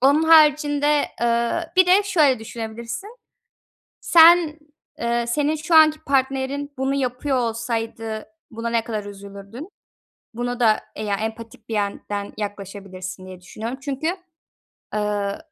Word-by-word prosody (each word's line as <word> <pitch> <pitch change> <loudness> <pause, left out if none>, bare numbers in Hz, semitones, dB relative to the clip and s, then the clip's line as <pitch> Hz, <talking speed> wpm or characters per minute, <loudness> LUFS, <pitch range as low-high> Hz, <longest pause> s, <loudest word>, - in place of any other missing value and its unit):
Onun 285 +4 +4
haricinde, 300 -2 +4 0.2
ııı, 235 +8 +1
bir 370 -1 +6
de 380 +3 +5
şöyle 310 - +3
düşünebilirsin. 230 - -7 0.8
Sen, 330 -2 +6 0.4
eee, 235 0 0
senin 295 +5 0
şu 315 +2 0
anki 310 -1 +6
partnerin 275 +1 -1
bunu 270 +1 0
yapıyor 260 +1 -1
olsaydı 225 -2 -3 0.3
buna 230 +1 -4
ne 230 -1 0
kadar 215 -3 -4
üzülürdün? 200 - -10 0.6
Buna 245 +1 -3
da 220 -3 +4 0.2
e 215 - -5
ya, 205 -1 0
empatik 225 +1 -7
bir - - -3
yönden 205 0 -3
yaklaşabilirsin 195 -3 -7
diye 185 -1 -11
düşünüyorum 225 +7 -6
çünkü, 280 +2 -3 0.9
ııı, 205 -1 -1
235 Hz, 125 wpm, -22 LUFS, 215-290 Hz, 0.9 s, bir